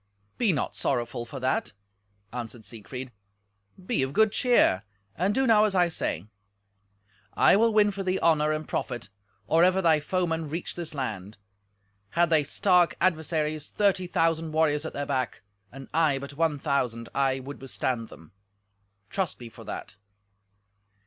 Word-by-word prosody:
"Be 230 -5 +3
not 145 - -2
sorrowful 120 -2 -2
for 135 - -7
that," 130 +1 0 0.6
answered 120 -2 -6
Siegfried; 125 +3 -8 0.7
"be 230 - 0
of 135 +1 -1
good 220 +2 +4
cheer, 240 - +3 0.3
and 185 +4 +1
do 265 - +2
now 220 -3 +5
as 205 -2 0
I 175 -2 +4
say. 95 - -2 1.1
I - - +6
will 230 +3 +4
win 210 -1 +4
for 200 0 -5
thee 185 0 0
honour 155 -2 +3
and 155 0 -3
profit 120 -8 -3 0.4
or 165 +9 +4
ever 185 +1 +4
thy 165 -4 +4
foemen 165 -1 -1
reach 165 +4 -4
this 170 -3 -6
land. 105 -7 -4 0.7
Had 170 +4 +2
they 155 -2 +4
stark 180 +2 +3
adversaries 155 -3 0
thirty 195 -3 +1
thousand 165 -2 0
warriors 155 -1 +2
at - - -5
their 145 - -3
back, 130 -6 -2 0.3
and 135 +1 -10
I 155 -3 +3
but 140 +1 -7
one 155 0 +1
thousand, 125 -5 -1
I 135 -1 +1
would 135 +2 -9
withstand 125 -3 -2
them—trust 100 - -8
me 120 -2 -9
for 115 0 -13
that." 105 0 -7
150 Hz, 155 wpm, -27 LUFS, 125-175 Hz, 1.1 s, I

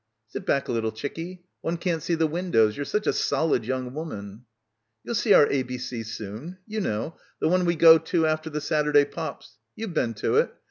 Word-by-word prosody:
"Sit - - -7
back 140 - +1
a - - -2
little, 115 -2 0
chickie. 165 +10 -6 0.2
One 170 +1 -2
can't 170 -2 -1
see 170 - 0
the 160 0 +2
windows. 155 -10 +2
You're 145 - -3
such 210 0 -1
a - - +2
solid 150 -8 +1
young 130 0 -3
woman." 110 -8 -7 0.6
"You'll - - -4
see 225 -1 +1
our - - +8
ABC 125 -3 -3
soon. 110 - -7
You 215 -1 -3
know. 130 - -3 0.2
The - - +1
one 180 +1 +3
we 170 0 +2
go 165 0 +8
to 165 0 0
after 155 0 0
the 150 -1 -3
Saturday 150 -1 +3
pops. 155 -6 -7 0.2
You've 220 -5 -5
been 115 -7 0
to - - 0
it. - - +3
155 Hz, 200 wpm, -26 LUFS, 125-170 Hz, 0.6 s, our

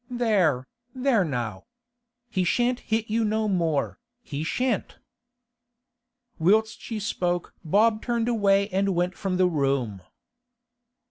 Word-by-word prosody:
'There, 200 - +1 0.3
there 255 -5 +2
now! 120 - -3 0.7
He 185 - +1
shan't 245 +7 +1
hit 220 0 -1
you 225 +1 0
no 215 0 0
more, 165 - 0 0.2
he 150 -5 -4
shan't!' 245 +5 -1 1.4
Whilst 215 +6 +2
she 225 -2 -5
spoke 175 -4 -2
Bob 215 +6 +3
turned 235 -2 -1
away 200 -4 +3
and 195 0 0
went 180 +1 0
from 190 -2 -2
the 185 - +4
room. 135 - -1
195 Hz, 120 wpm, -25 LUFS, 165-220 Hz, 1.4 s, the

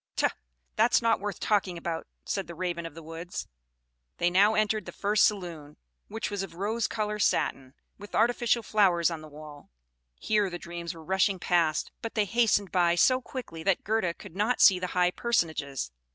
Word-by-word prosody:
"Tut! - - +1 0.4
That's 230 +3 +4
not 230 0 +3
worth 205 0 -4
talking 195 -4 0
about," 165 -1 -4 0.2
said 195 -2 -2
the 170 - -8
Raven 170 -1 -3
of 160 - -13
the 165 - -10
woods. 165 +3 -6 0.7
They 175 0 +1
now 205 +4 +4
entered 215 -2 0
the - - -5
first 210 +1 +2
saloon, 170 -8 -3 0.3
which 220 -1 -4
was 205 -1 -2
of 185 -4 -7
rose 215 +5 -1
colored 210 -1 -3
satin, 135 -5 0 0.2
with 205 0 -9
artificial 235 0 +2
flowers 180 -6 +3
on 165 -2 -5
the 155 - -10
wall. 150 -1 -12 0.5
Here 210 - +1
the 175 - -5
dreams 170 0 -6
were 165 - -11
rushing 190 +2 +1
past, 170 -4 +1
but 230 - -6
they 215 -2 +2
hastened 205 -3 +2
by 175 -2 +3
so 255 +8 +4
quickly 245 - -7
that 190 +2 +1
Gerda 200 -5 0
could 165 - -12
not 215 +5 +1
see 185 -3 +7
the 180 - -2
high 180 0 +4
personages. 155 - -1
185 Hz, 185 wpm, -28 LUFS, 170-210 Hz, 0.7 s, see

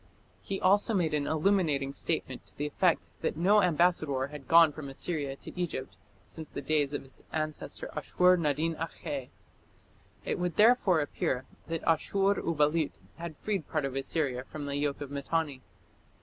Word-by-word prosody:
He 195 - -4
also 205 +4 +4
made 165 -5 +1
an 145 -1 0
illuminating 155 -5 +1
statement - - -3
to - - -22
the 145 - -2
effect 165 +4 +2 0.2
that - - -1
no 200 +5 +5
ambassador 155 -6 +2
had 145 -3 -10
gone 165 -1 +7
from 145 -2 -7
Assyria 140 -1 -2
to - - -11
Egypt 155 - -3 0.3
since 160 -1 -9
the - - -5
days 145 0 +1
of - - -4
his 135 - -15
ancestor 155 -1 -3
Ashur 180 0 +4
nadin 160 0 0
akhe. 150 -5 -5 1.0
It - - -1
would 175 -2 -1
therefore 210 -7 +5
appear 130 -3 -2 0.2
that 165 -1 -3
Ashur 195 +5 +2
uballit 155 -1 +1 0.2
had 165 -3 -7
freed 200 -6 -1
part 155 -3 0
of 135 -1 -4
Assyria 135 -2 -1
from 145 +2 -7
the 140 0 -3
yoke 145 0 -1
of 140 -1 -6
Mitanni. 145 -1 -2
155 Hz, 165 wpm, -30 LUFS, 140-175 Hz, 1.0 s, gone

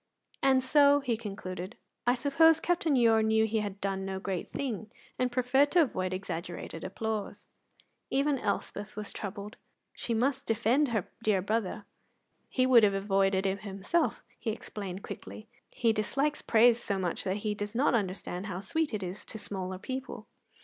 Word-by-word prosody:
"And 265 -1 +4
so," 285 +1 +5
he 250 -4 0
concluded, 195 -3 -6 0.3
"I 245 - +5
suppose 305 +5 +4
Captain 340 -4 +1
Ure 225 -3 +5
knew 220 0 +3
he 220 0 0
had 200 -2 -4
done 195 -1 -2
no 190 0 -3
great 190 -2 -3
thing, 225 -6 -4 0.3
and 250 -1 +1
preferred 255 +3 +3
to 350 -2 +7
avoid 185 -9 -2
exaggerated 175 -3 -5
applause." 215 +2 -4 0.6
Even 275 0 +1
Elspeth 205 0 -3
was 210 -1 -4
troubled; 205 +1 -6
but - - -19
she 230 - 0
must 265 +4 0
defend 235 +6 +2
her 220 -7 -1
dear 210 -5 +2
brother. 210 0 -1 0.6
"He 255 - +2
would 255 -2 +7
have 200 -2 +4
avoided 195 -1 +2
it 195 +1 0
himself," 205 - -1 0.2
she 230 - -3
explained 200 -3 -5
quickly. 215 - -8 0.2
"He 230 -2 +1
dislikes 275 +7 0
praise 235 +1 +5
so 200 - -1
much 180 -3 -2
that 190 +1 -1
he 210 - +1
does 205 +1 -5
not 265 +3 +3
understand 195 -3 -2
how 185 -2 -4
sweet 295 +5 -1
it 200 - -4
is 185 +2 -5
to - - -7
smaller 190 -3 -5
people." 260 +7 -6
215 Hz, 170 wpm, -30 LUFS, 195-255 Hz, 0.6 s, to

